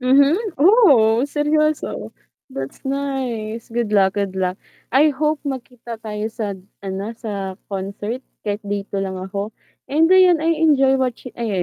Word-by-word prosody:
Mhm, 275 +4 +5 0.2
oh 280 - +6
seryoso, 305 +1 0 0.4
that's 135 - -6
nice, 260 -5 -3
good 230 -2 -1
luck, 195 -2 +4
good 200 -2 -2
luck. 185 0 -1 0.3
I 290 +2 +4
hope 305 +2 +1
magkita 240 -4 -6
tayo 210 -1 -3
sa 215 -3 -2 0.3
ano, 195 +3 -4
sa 200 -4 -5 0.2
concert 200 +4 -4 0.2
kahit 205 -1 -2
day 200 0 -1
2 200 - -2
lang 195 -1 -2
ako. 200 +3 -5 0.3
And 320 +5 +3
ayun, 365 -4 +6
I 330 - +2
enjoy 270 -4 +4
watching 255 -1 -2
ay 210 -6 -1
235 Hz, 145 wpm, -21 LUFS, 200-280 Hz, 0.4 s, oh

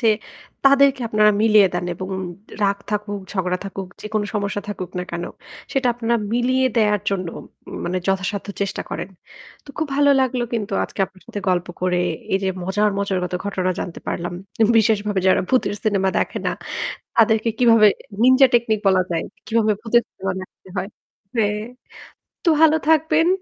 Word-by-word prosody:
যে 230 - +1 0.6
তাদেরকে 275 -1 +5
আপনারা 210 0 +4
মিলিয়ে 215 -3 +6
দেন 175 - -1
এবং 185 +2 -6 0.5
রাগ 200 0 +2
থাকুক, 205 -1 -2
ঝগড়া 180 -2 -1
থাকুক, 195 -1 -5
যেকোন 215 0 -2
সমস্যা 205 0 -1
থাকুক 185 -3 -5
না - - -1
কেন, 170 0 -3 0.5
সেটা 270 -1 +1
আপনারা 235 0 0 0.2
মিলিয়ে 255 +2 +2
দেয়ার 210 -2 +3
জন্য 185 -3 -2 0.6
মানে 180 +1 -1
যথাসাধ্য 195 +1 -1
চেষ্টা 200 - -2
করেন। - - -4 0.6
তো - - -20
খুব 315 - 0
ভালো 285 0 +5
লাগলো 255 -1 0
কিন্তু 210 -3 -3
আজকে - - -7
আপনার 185 0 -22
সাথে 205 - -5
গল্প 180 -1 +1
করে 180 -1 +1 0.3
এই 195 - +3
যে 190 - +1
মজার, 205 +4 +1
মজার 200 -2 0
কত 180 - -4
ঘটনা 185 -2 -1
জানতে 170 - -6
পারলাম। 175 +1 -3 0.5
বিশেষভাবে 210 -2 +2
যারা 185 - +4
ভূতের 255 -5 +2
সিনেমা 195 -3 +2
দেখে - - -1
না, - - +1 0.6
তাদেরকে 225 0 +4
কিভাবে 230 -3 +6 0.4
নিন্জা 260 +2 +7
টেকনিক 230 -2 +3
বলা 190 -1 +5
যায়। 165 -1 -1 0.2
কীভাবে 220 -1 +2
ভূতের 235 +1 +3
সিনেমা 190 0 -4
দেখতে 185 0 -13
হয়। 185 +2 -2 0.5
হ্যাঁ, 210 -2 +1 0.8
তো 345 - +3
ভালো 315 -1 +6
থাকবেন। 320 +1 +4
210 Hz, 160 wpm, -21 LUFS, 190-235 Hz, 0.8 s, নিন্জা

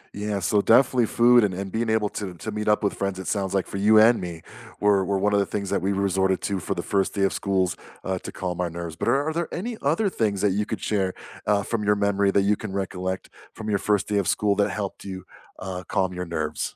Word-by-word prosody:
Yeah, 105 -1 -2
so 100 +4 +2
definitely 125 +1 +4
food 120 0 +5
and 95 -3 0
and 95 +1 -5
being 115 +2 -1
able 110 -1 +2
to 95 -4 -6
to 110 +6 -6
meet 105 0 -4
up 105 0 +3
with 100 - +1
friends, 100 -1 -2
it 95 - -6
sounds 100 -2 -1
like 95 - +1
for - - -6
you 105 +2 +5
and 115 +2 +6
me, 85 -3 -6 0.4
were 100 -2 +3
were 100 +1 0
one 105 +2 +1
of 100 - +4
the 100 - +2
things 100 -2 -3
that - - +1
we 95 - 0
resorted 95 -1 +1
to 100 -2 -1
for 90 - -3
the 85 - -3
first 100 -2 0
day 100 - +1
of 95 - +2
schools, 95 -3 0 0.3
uh, 95 -1 -2
to - - -8
calm 90 -1 -3
our 90 - -1
nerves. 85 -1 -6
But 85 - -4
are 140 +6 +2
there 170 +1 -2
any 230 +6 -4
other 165 +9 +1
things 105 - -1
that 105 - +3
you 105 +2 -1
could - - -4
share, 95 -3 0 0.3
uh, 105 -1 +3
from 110 +1 -2
your 105 0 +3
memory 100 -1 +2
that 100 0 +3
you 105 +1 +3
can 105 -1 -7
recollect 95 -1 -3 0.2
from 110 -1 -6
your 100 - +1
first 105 -1 +1
day 105 -1 +1
of 95 - -1
school 105 -1 +2
that 105 0 +2
helped 100 -2 -5
you, 95 -2 -7 0.3
uh, 90 -1 -5
calm 95 -1 0
your 90 0 -4
nerves? 80 -2 -3
100 Hz, 260 wpm, -24 LUFS, 95-105 Hz, 0.4 s, and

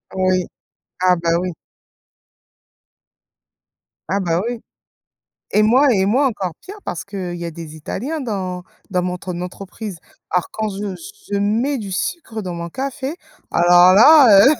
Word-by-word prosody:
Oui. 185 -1 +2 0.6
Ah 180 0 +4
bah 170 0 -1
oui. 180 0 -3 2.6
Ah 200 +1 +1
bah 170 -1 0
oui 240 -1 -4 0.9
et 210 - +4
moi 255 +7 +5
et 190 -1 +2
moi 260 +8 +3
encore 195 -7 -3
pire, 400 - -10
parce 175 - -5
qu'il 185 -3 -5
y 170 - -5
a - - -3
des 160 -1 -9
Italiens 265 - -4
dans 190 -8 -4 0.3
dans 180 -2 0
mon 180 0 -2
tre 180 0 -6
entreprise. 190 +2 -7 0.3
Alors 180 -2 0
quand 220 0 -2
je 200 -1 -4 0.4
je 200 - +1
mets 230 +8 +1
du 205 -5 -6
sucre 225 - -3
dans 180 -3 -5
mon 170 0 -5
café, 270 - -4 0.4
alors 175 +1 +6
là 230 -3 +8
heu, 290 - +6
195 Hz, 150 wpm, -20 LUFS, 180-230 Hz, 2.6 s, là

